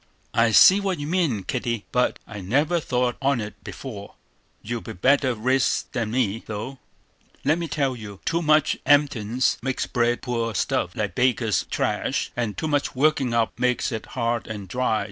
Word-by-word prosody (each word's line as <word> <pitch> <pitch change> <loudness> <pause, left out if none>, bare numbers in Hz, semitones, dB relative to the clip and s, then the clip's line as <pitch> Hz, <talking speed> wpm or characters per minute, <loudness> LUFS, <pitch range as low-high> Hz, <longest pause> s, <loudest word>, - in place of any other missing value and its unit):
"I 115 0 +4
see 185 - +8
what 195 -3 -1
you 145 - -5
mean, 155 - 0
Kitty; 115 -2 -3
but 125 0 +1
I 105 - -8
never 145 - +1
thought 125 -4 -1
on't 110 -7 -1
before. 105 -7 -8 0.5
You 115 +2 -4
be 110 - -7
better 130 +5 +2
riz 130 +4 +1
than 120 -5 -2
me; 115 -2 0
though, 110 +5 -6 0.7
let 155 +4 +3
me 170 - -3
tell 140 -4 -1
you, 105 -4 -9
too 170 +1 +1
much 155 -2 +3
emptins 130 -5 +2
makes 135 -1 -1
bread 120 0 0
poor 115 -3 -2
stuff, 90 -1 -1
like 105 -4 -2
baker's 120 -3 +1
trash; - - -1
and 115 -4 -2
too 160 - -2
much 145 -1 0
workin' 135 -2 +2
up 115 -1 0
makes 125 -1 +1
it 110 -2 -5
hard 115 -1 -1
and 105 -3 -6
dry. 120 +1 0
125 Hz, 170 wpm, -24 LUFS, 110-140 Hz, 0.7 s, see